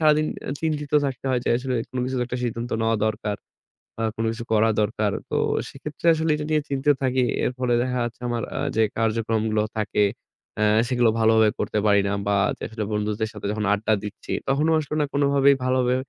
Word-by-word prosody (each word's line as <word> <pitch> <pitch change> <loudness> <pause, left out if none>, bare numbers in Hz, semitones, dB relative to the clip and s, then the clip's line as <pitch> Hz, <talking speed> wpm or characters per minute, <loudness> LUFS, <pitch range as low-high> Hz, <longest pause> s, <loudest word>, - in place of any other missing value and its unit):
সারাদিন 155 0 +4 0.3
চিন্তিত 150 -3 -2
থাকতে 130 -1 -5
হয় 125 -1 +1
যে - - -1
আসলে 130 0 -2 0.2
কোন 130 - -5
কিছু 130 +1 -3
তো 125 - +1
একটা 125 0 -4
সিদ্ধান্ত 120 +1 -3
নেওয়া 115 0 +2
দরকার 105 -1 -2 0.6
বা 115 - -2
কোন 115 - -2
কিছু 115 0 -6
করা 110 +1 +4
দরকার। 105 0 0 0.2
তো - - -1 0.3
সেক্ষেত্রে 150 +4 -5
আসলে 160 +1 -1
এটা 150 0 -4
নিয়ে 155 -1 +3
চিন্তিত 140 +1 +2
থাকি। 130 0 +2 0.2
এর - - +1
ফলে 125 -2 +1
দেখা 125 0 -2
যাচ্ছে 120 +1 -6
আমার 120 -2 -2
আ - - -1 0.2
যে 110 - +4
কার্যক্রমগুলো 110 -1 0 0.2
থাকে 105 0 +1 0.6
আ - - +4 0.2
সেগুলো 120 -2 +3
ভালোভাবে 110 -1 +5
করতে 105 - 0
পারি 100 0 +5
না 100 - 0
বা 100 - +2 0.2
যে - - -39
আসলে 110 -1 -4
বন্ধুদের 105 +1 -1
সাথে 105 -1 -8
যখন 105 0 -2
আড্ডা 110 +2 +1
দিচ্ছি 105 +1 -7 0.2
তখনও 150 +4 +2
আসলে 150 0 -4
না 150 - +2
কোনভাবেই 140 -1 +4
ভালোভাবে 130 -1 +2
120 Hz, 200 wpm, -24 LUFS, 110-135 Hz, 0.6 s, ভালোভাবে